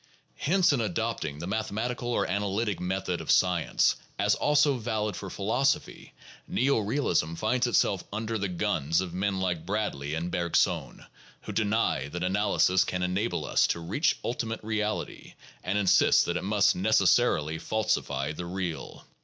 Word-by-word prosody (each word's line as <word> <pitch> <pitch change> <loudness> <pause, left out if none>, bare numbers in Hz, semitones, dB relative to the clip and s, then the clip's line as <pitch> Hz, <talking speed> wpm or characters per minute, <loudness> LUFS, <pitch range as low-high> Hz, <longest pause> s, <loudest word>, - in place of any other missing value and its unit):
Hence, 175 0 +3
in 130 - 0
adopting 105 -7 -2
the 80 - -6
mathematical 110 +4 -3
or 120 - +1
analytic 100 +2 -1
method 90 -1 -2
of - - -9
science 90 -3 +3 0.2
as - - +2
also 145 -2 +3
valid 110 -3 -2
for 95 - -6
phi 100 - -7
losophy, 130 +7 0 0.3
neo 135 0 +1
realism 100 - 0
finds 120 +7 0
itself 100 -5 +2
under 110 +1 -3
the 100 - -1
guns 80 -3 0
of 90 -2 -3
men 95 +1 -1
like 90 -4 -1
Bradley 85 -7 -2
and 85 +2 -3
Bergson, 85 -1 0 0.4
who - - -6
deny 105 -9 0
that 90 +4 -5
analysis 95 -1 +2
can 90 0 -3
enable 95 +6 -1
us - - +3
to - - -1
reach 135 - 0
ultimate 115 -2 -3
reality, 105 0 -3 0.3
and 100 +3 -1
insist 100 -3 +4
that 85 - -2
it 90 - -2
must 100 +1 +3
necessarily 95 -5 +2
falsify 75 -8 -1
the 85 +3 -6
real. 90 -5 -5
100 Hz, 155 wpm, -28 LUFS, 90-110 Hz, 0.4 s, insist